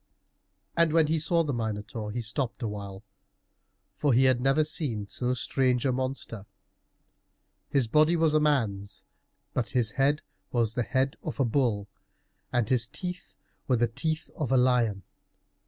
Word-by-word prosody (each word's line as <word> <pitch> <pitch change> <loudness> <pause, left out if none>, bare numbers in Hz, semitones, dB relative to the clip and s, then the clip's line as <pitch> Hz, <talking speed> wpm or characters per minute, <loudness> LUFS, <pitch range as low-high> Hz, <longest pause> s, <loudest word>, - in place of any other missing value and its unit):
And 165 -2 +3
when 165 -1 +5
he 160 +1 +1
saw 165 +2 +2
the 145 -3 -2
Minotaur, 110 -1 -4
he 120 +3 -3
stopped 115 0 -3
a - - 0
while, 100 -1 -7 0.9
for 145 -3 +2
he 125 +3 +5
had 130 -2 +3
never 135 +4 +3
seen 135 -9 -2
so 125 +4 -1
strange 125 -1 +1
a 130 - +3
monster. 130 -5 -3 1.2
His 135 -4 +2
body 155 +7 +4
was 160 -2 +2
a 155 - +5
man's, 110 -10 0 0.5
but 120 -3 -1
his 120 -4 +1
head 140 +6 +1 0.3
was 115 -3 +1
the 125 - 0
head 130 +2 0
of - - -6
a 135 - +3
bull, 115 -5 +1 0.6
and 120 -3 +1
his 120 -3 +2
teeth 180 +6 -6 0.3
were 130 - +3
the 120 - +3
teeth 155 +7 -3
of 150 -4 -2
a 130 - +5
lion. 120 -6 +2
125 Hz, 160 wpm, -28 LUFS, 115-150 Hz, 1.2 s, when